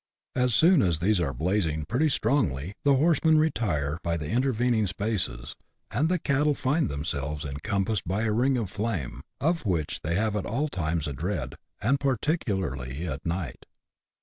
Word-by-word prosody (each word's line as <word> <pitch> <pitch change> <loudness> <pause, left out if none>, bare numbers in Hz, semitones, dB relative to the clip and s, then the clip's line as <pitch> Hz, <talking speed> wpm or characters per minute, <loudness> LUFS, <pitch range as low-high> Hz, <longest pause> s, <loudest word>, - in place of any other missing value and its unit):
As 125 -2 +2
soon 170 -2 +6
as 85 -4 +2
these 95 +4 +2
are 75 -5 0
blazing 80 +1 0
pretty 135 - +1
strongly, 100 - 0
the 140 -1 +5
horsemen 160 +2 +4
retire 85 - 0
by 85 -1 -1
the 75 +1 -5
intervening 120 -3 +2
spaces, 95 - -2 0.4
and 155 +5 +1
the 180 - +2
cattle 145 -1 +1
find 145 +3 +1
themselves 70 +1 -3
encom 95 +8 -1
passed 105 -5 -2
by 100 +5 0
a 110 - +1
ring 125 +4 +2
of 105 -6 -3
flame, 100 - -3 0.2
of 165 +3 +1
which 85 -8 -1
they 85 +2 -1
have 105 +2 +1
at 105 - -2
all 140 +8 -1
times 80 - -1
a 75 - -3
dread, 80 0 -3 0.3
and 135 +5 +3
particularly 95 - -1
at 70 -2 -4
night. 85 -5 -4
105 Hz, 170 wpm, -27 LUFS, 80-130 Hz, 0.4 s, soon